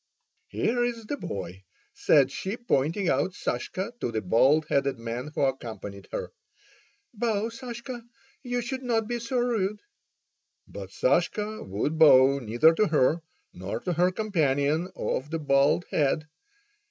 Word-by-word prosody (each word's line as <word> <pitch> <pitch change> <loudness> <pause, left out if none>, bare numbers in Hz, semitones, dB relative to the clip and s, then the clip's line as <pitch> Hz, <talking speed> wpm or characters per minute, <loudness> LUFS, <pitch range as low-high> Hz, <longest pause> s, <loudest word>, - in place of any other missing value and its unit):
"Here's 240 -1 -1
the 290 - -3
boy," 95 - -6 0.3
said - - +4
she, 195 +4 -4
pointing 180 - 0
out 150 +7 +1
Sashka 195 +6 -3
to 120 - -2
the 110 -1 -2
bald 135 - +4
headed 140 -2 +1
man 115 +3 -5
who - - -1
accompanied 115 -7 -3
her. - - -4 0.8
"Bow, 220 -1 -1
Sashka, 240 +1 -7 0.4
you 245 -2 -2
should 260 +2 -4
not 230 -4 0
be 240 0 -2
so 235 +2 -3
rude!" 215 -4 0 0.9
But - - -8
Sashka 215 - 0
would 125 +12 -2
bow 140 -3 +7
neither 120 +7 +4
to 215 +6 +2
her, 155 +1 +2 0.3
nor 95 +5 -5
to 180 - -2
her 180 +2 +3
companion 160 -5 0
of 135 +3 -2
the 165 - -2
bald 140 +2 +2
head. 155 +2 +1
165 Hz, 140 wpm, -27 LUFS, 135-225 Hz, 0.9 s, bow